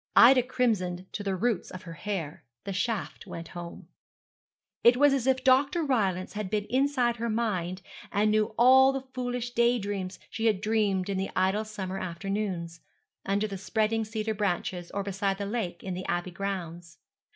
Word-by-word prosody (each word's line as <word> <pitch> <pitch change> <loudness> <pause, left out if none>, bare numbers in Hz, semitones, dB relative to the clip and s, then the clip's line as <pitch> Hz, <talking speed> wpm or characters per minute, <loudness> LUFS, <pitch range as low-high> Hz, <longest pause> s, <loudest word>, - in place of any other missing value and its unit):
Ida 255 +2 +8
crimsoned 215 -8 0
to - - -4
the 195 -2 -1
roots 220 0 0
of 185 - -9
her 170 - -8
hair. 165 -3 -4 0.2
The 195 - -4
shaft 215 +3 -2
went 165 0 -7
home. 175 -1 -8 1.0
It 240 +1 +7
was 290 +1 +5
as 265 -2 0
if 260 -1 +2
Dr. 275 +6 +4
Rylance 195 - 0
had 210 -2 -4
been 210 0 -1
inside 255 -3 +2
her 235 +1 -2
mind 190 -5 -1 0.3
and 210 +1 +2
knew 215 +1 +1
all 265 +2 +7
the 270 -1 -4
foolish 245 -1 -3
day 235 +1 +3
dreams 200 -3 -4
she 225 0 0
had 210 -4 +2
dreamed 205 -3 +1
in 195 -1 -1
the 190 - -2
idle 190 +4 +1
summer 195 -3 -5
afternoons, 180 -2 -3 0.5
under 200 +2 +1
the 200 -3 -5
spreading 220 +2 0
cedar 220 0 -2
branches, 180 -3 -2
or 200 - -3
beside 195 0 -1
the 200 - -3
lake 200 -5 -3
in 190 - -3
the 185 +1 -5
Abbey 175 +1 -1
grounds. 175 -3 -5
205 Hz, 175 wpm, -28 LUFS, 185-235 Hz, 1.0 s, Ida